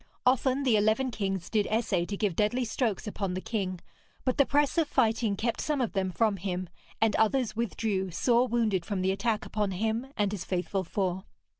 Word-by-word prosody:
Often 260 +2 +3
the 250 -5 +4
eleven 220 +5 +2
kings 195 -5 -2
did 210 -2 +1
essay 205 -6 +1
to 200 - -4
give 200 -5 0
deadly 240 +6 +1
strokes 225 -3 -1
upon 195 -3 -3
the - - -1
king, 190 -4 -3 0.5
but 255 +2 0
the 280 - +5
press 290 +3 +2
of 320 - +2
fighting 225 -5 +2
kept 230 +3 -1
some 300 -2 0
of 245 -4 -1
them 190 -2 0
from 200 +3 +1
him, 180 -1 -3 0.3
and 220 -2 +3
others 220 0 +2
withdrew 215 -4 -1
sore 240 +8 +2
wounded 225 -7 +1
from 190 0 -2
the 190 - +2
attack 215 +2 -1
upon 210 -2 -1
him 220 +6 -1
and 205 -1 +1
his 200 -4 -4
faithful 185 +1 -1
four. 190 +1 -2
215 Hz, 195 wpm, -29 LUFS, 190-235 Hz, 0.5 s, the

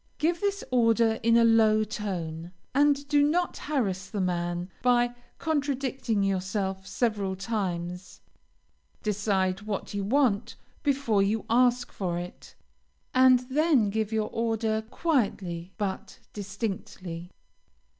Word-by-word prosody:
Give 335 +2 0
this 400 -1 0
order 230 -2 +3
in 230 0 +4
a 235 - +6
low 220 -1 +5
tone, 180 -6 -5 0.2
and 285 0 +3
do 290 0 +4
not 340 +5 +1
harass 200 -11 -2
the 210 - -4
man 175 -1 -1
by 245 -1 +3 0.2
contradicting 270 -8 -1
yourself 190 0 -1
several 205 -5 -1
times; 185 -3 -4 0.8
decide 200 -2 0
what 210 -1 -4
you 200 -1 -2
want 235 -2 +1 0.3
before 275 -8 +2
you 210 +3 0
ask 245 +1 +3
for 175 -3 -2
it, 175 +1 -8 0.6
and 255 -1 +6
then 265 -4 +2
give 220 0 -1
your 220 -1 -1
order 225 -1 0
quietly 195 - -1
but 200 -3 -4 0.2
distinctly. 195 -4 -5
215 Hz, 115 wpm, -27 LUFS, 190-250 Hz, 0.8 s, a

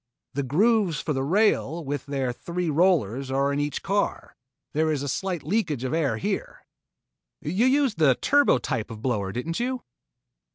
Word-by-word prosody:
The 140 - -1
grooves 185 - +2
for 150 - -2
the 135 - -1
rails 170 -1 +1
with 145 +1 -4
their 135 -3 -1
three 170 +4 -3
rollers 140 - +2
are 140 +1 +1
in 140 - -1
each 145 0 -2
car. 200 +1 -1 0.4
There 155 +1 +2
is 145 -2 -1
a - - -3
slight 180 +3 -2
leakage 155 - -1
of 130 - -2
air 145 -9 +1
here." - - -4 0.7
"You 190 - +1
used 270 - +2
the 140 -5 +5
turbo 285 - +4
type 115 -7 -3
of 110 -1 -9
blower, 105 -7 -1
didn't 125 +10 -3
you?" 250 +1 -2
150 Hz, 170 wpm, -25 LUFS, 135-190 Hz, 0.7 s, the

